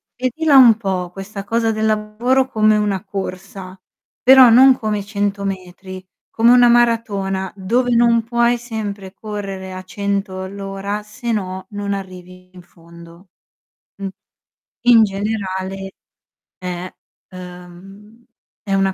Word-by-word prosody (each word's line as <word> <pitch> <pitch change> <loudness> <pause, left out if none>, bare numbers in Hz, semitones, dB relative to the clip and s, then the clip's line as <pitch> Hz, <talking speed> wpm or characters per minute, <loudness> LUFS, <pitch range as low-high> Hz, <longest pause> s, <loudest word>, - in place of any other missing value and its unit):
vedila 275 +4 +2
un 240 -4 +8
po' 185 -5 -3
questa 195 +2 -8
cosa 225 +2 0
del 215 0 -2
lavoro, 220 +5 +1
come 215 -3 +2
una 205 -3 -1
corsa, 190 -1 -7 0.4
però 260 -1 +8
non 260 +3 +7
come 215 -1 -2
i 200 - -7
100 205 -1 -2
metri, 185 -1 -7 0.3
come 230 +1 +4
una 245 -1 +6
maratona 210 -5 +1
dove 240 +6 0
non 235 -1 +3
puoi 235 +1 +1
sempre 210 -5 -6
correre 195 -3 -7
a 185 - -7
100 195 0 -3
all'ora 195 +1 -5
se 215 +3 -6
no 190 -3 -3
non 205 -1 -3
arrivi 185 -1 -9
in 180 - -13
fondo. 170 +1 -17 0.7
Mh. 195 - -3 0.8
In 230 -2 +7
generale, 195 -2 -4 0.7
è 180 0 -6 0.4
uhm, 185 +5 -13 0.4
è 195 - -3
una 195 0 +1
200 Hz, 125 wpm, -19 LUFS, 190-225 Hz, 0.8 s, un